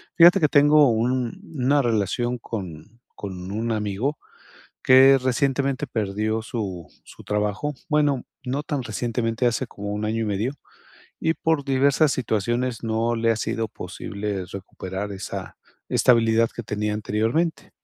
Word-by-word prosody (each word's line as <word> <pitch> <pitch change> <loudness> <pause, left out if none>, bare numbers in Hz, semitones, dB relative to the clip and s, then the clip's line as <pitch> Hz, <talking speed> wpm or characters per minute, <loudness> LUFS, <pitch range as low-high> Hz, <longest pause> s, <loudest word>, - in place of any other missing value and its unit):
fíjate 175 +3 +7
que 150 - +5
tengo 145 0 +6
un 125 - 0
una 140 +2 +3
relación 120 +1 0
con 105 +1 -8
con 95 -2 -7
un 115 +3 -2
amigo, 110 +6 -1 0.7
que 135 +1 +7
recientemente 135 +2 0
perdió 110 -1 -1
su 100 -7 -5 0.2
su - - -14
trabajo. 105 +8 -1
Bueno, 145 -4 +2 0.2
no 135 +3 -2
tan 145 -3 -2
recientemente, 115 +1 -1
hace 120 +2 0
como 100 -3 -8
1 105 +1 -3
año 110 +1 -1
y - - 0
medio, 105 +6 -1 0.7
y 160 - +1
por 160 -4 0
diversas 140 +2 +3
situaciones 120 +1 -1
no 115 +1 0
le 115 0 +2
ha - - +1
sido 115 0 -2
posible 100 -2 -5
recuperar 95 +2 -6
esa 95 -2 -7 0.3
estabilidad 115 -2 +4
que - - -4
tenía 105 0 -2
anteriormente. 110 +10 -1
115 Hz, 140 wpm, -24 LUFS, 105-135 Hz, 0.7 s, fíjate